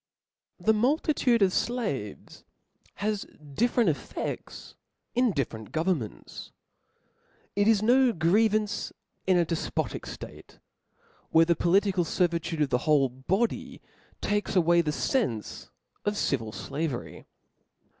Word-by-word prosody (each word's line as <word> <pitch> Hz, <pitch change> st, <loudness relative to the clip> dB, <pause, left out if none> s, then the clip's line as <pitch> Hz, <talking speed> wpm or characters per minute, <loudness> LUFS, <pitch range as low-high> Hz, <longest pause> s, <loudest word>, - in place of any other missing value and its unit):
fTPHE 220 Hz, -, +4 dB
multitude 250 Hz, -1 st, +2 dB
of 190 Hz, -, +3 dB
flaves 205 Hz, -, -3 dB, 0.5 s
has 210 Hz, 0 st, -2 dB, 0.3 s
different 240 Hz, -, +2 dB
ef 155 Hz, -, +2 dB
'*' -, -, -15 dB
fefts -, -, -5 dB, 0.4 s
in 245 Hz, -1 st, +3 dB
different 115 Hz, -, -4 dB
governments. 160 Hz, -, -3 dB, 1.0 s
It 205 Hz, +1 st, +2 dB
is 215 Hz, -2 st, +4 dB
no 250 Hz, +2 st, +5 dB
grievance 210 Hz, +4 st, +1 dB, 0.4 s
in 185 Hz, -1 st, +4 dB
a 175 Hz, -, +3 dB
defpotic 165 Hz, 0 st, -3 dB
date, -, -, -12 dB, 0.7 s
where 165 Hz, 0 st, +5 dB
the 170 Hz, 0 st, +2 dB
political 190 Hz, +1 st, +2 dB
fervitude 170 Hz, -1 st, -1 dB
of 140 Hz, -, -1 dB
the 125 Hz, -, +2 dB
whole 140 Hz, -3 st, +4 dB
body 185 Hz, -, -2 dB, 0.4 s
takes 205 Hz, 0 st, -1 dB
away 170 Hz, -1 st, +4 dB
the 160 Hz, -, -2 dB
fenfc 150 Hz, -, -2 dB, 0.3 s
of 205 Hz, 0 st, -1 dB
civil 115 Hz, -, -1 dB
flavery. 140 Hz, +1 st, -5 dB
180 Hz, 115 wpm, -27 LUFS, 155-215 Hz, 1.0 s, no